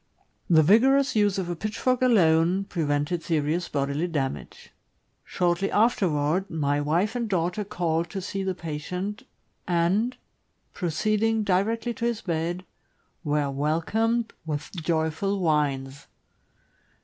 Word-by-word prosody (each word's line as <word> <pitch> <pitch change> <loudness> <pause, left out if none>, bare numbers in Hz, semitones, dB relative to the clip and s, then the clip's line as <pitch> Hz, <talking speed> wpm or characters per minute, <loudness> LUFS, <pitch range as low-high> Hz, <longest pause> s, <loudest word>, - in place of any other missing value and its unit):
The 160 -2 +6
vigorous 260 - +4
use 205 -2 +2
of 190 -2 -2
a 175 - -3
pitchfork 225 +7 -1
alone 180 -6 +4
prevented 155 -2 -1
serious 160 +2 -1
bodily 140 +4 -1
damage. 140 -6 -4 0.5
Shortly 175 +2 0
afterward, 185 -6 +1
my 145 -2 0
wife 175 +10 0
and 235 -2 -2
daughter 180 +2 0
called 170 -4 -1
to 195 - -4
see 195 +1 -4
the 190 -1 -2
patient, 180 +5 -5 0.5
and, 185 +8 +1 0.6
proceeding 215 +6 0
directly 220 +5 0
to 235 -1 -4
his 235 -2 -1
bed, 170 +1 -2 0.6
were 145 -2 0
welcomed 210 +11 0
with 150 -2 -4
joyful 165 +3 -1
whines. 140 -5 -1
175 Hz, 115 wpm, -26 LUFS, 155-210 Hz, 0.6 s, The